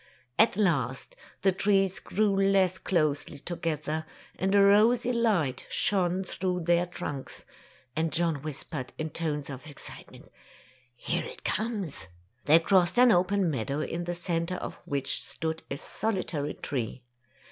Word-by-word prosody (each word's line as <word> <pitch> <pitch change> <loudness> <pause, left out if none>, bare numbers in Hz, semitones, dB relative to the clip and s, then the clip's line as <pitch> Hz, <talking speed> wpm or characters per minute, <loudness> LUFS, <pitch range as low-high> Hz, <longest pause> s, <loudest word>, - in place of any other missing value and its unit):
At 220 -3 +5
last 140 - 0 0.3
the 195 - +5
trees 195 0 +2
grew 205 -1 +1
less 195 -2 +3
closely 155 -5 0
to 175 +5 -5
gether, 155 -1 -2 0.3
and 190 +1 +1
a 200 - +7
rosy 225 +5 +5
light 200 - +1
shone 185 -2 +1
through 180 -1 -2
their 175 +1 +2
trunks, 145 -5 -6 0.5
and 160 0 0
John 165 -2 +1
whispered, 145 -1 -6
in 155 0 -3
tones 150 -3 -2
of 135 +3 -8
excitement, 145 - -8 0.7
''Here - - -1
it - - -11
comes!" 205 - -2 0.4
They 155 +2 +7
crossed 175 +3 +3
an 250 -1 +7
open 185 -1 +3
meadow, 140 +3 -2
in 170 +2 -3
the 175 0 -2
centre 170 +1 -1
of - - -5
which 140 -1 -1
stood 160 0 -3
a 140 - -3
solitary 175 -6 -2
tree. 125 -2 -4
175 Hz, 140 wpm, -28 LUFS, 150-195 Hz, 0.7 s, a